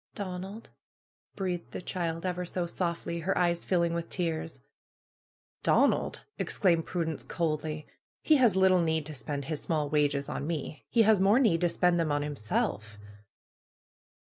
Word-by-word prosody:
'^Donald!" 195 +2 -6 0.7
breathed 180 -3 -3
the - - -4
child, 165 -1 -3
ever 180 -1 -1
so 180 0 -2
softly, 170 -1 -3
her 185 +4 -1
eyes 170 -1 +1
filling 170 -2 +1
with 170 0 -3
tears. 165 -2 -2 1.0
Donald - - +2
!" - - -54
exclaimed 170 -4 +2
Prudence, 160 -4 -2
coldly. 155 -2 -2 0.4
^^He 305 -3 +5
has 235 -7 +5
lit 190 0 +5
tle 185 -1 +4
need 160 -2 0
to 155 - -7
spend 140 0 -4
his 155 -1 -3
small 150 -3 -1
wages 145 -2 +1
on 145 - -4
me. 155 -2 -4
He 230 - +4
has 215 -2 +5
more 200 +4 +5
need 190 -11 +3
to 175 - +3
spend 175 0 +2
them 160 -3 +1
on 145 0 +1
himself.' 110 -6 -2
170 Hz, 160 wpm, -29 LUFS, 155-185 Hz, 1.0 s, ^^He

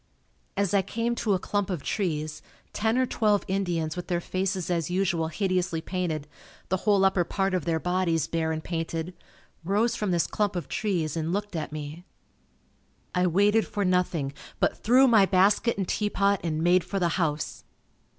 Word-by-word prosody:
As 200 -2 +1
I 200 - +5
came 230 +4 -2
to 215 -4 +1
a - - -1
clump 205 +1 -1
of 175 -7 -3
trees, 155 -6 -2 0.3
ten 220 +3 +1
or 255 - +3
twelve 210 -4 +1
Indians 175 -5 -1
with 180 - -5
their 175 -2 0
faces 185 0 -2
as 170 -2 0
usual 175 -3 0
hideously 185 -1 -1
painted, 160 -4 -3 0.4
the 190 - +2
whole 200 0 +3
upper 190 -2 +3
part 195 +2 -1
of 180 -5 -1
their 165 -1 +1
bodies 180 -3 +1
bare 160 -1 -1
and 160 0 -3
painted, 165 0 -3 0.5
rose 210 +6 +1
from 210 -4 -2
this 170 -3 +2
clump 205 -3 -1
of 175 - -3
trees 175 -8 -1
and 165 0 -2
looked 205 0 -3
at 155 -2 -3
me. 155 +2 -7 1.1
I 180 -1 +2
waited 205 +5 +3
for 205 -2 -2
nothing, 180 -6 0 0.3
but - - +2
threw 255 +4 +5
my 220 -5 +5
basket 200 +5 +3
and 195 -2 -2
teapot 200 -2 +1
and 160 -1 -1
made 175 +1 +4
for 190 +4 -4
the 175 -2 +2
house. 160 -3 -2
180 Hz, 180 wpm, -27 LUFS, 165-200 Hz, 1.1 s, I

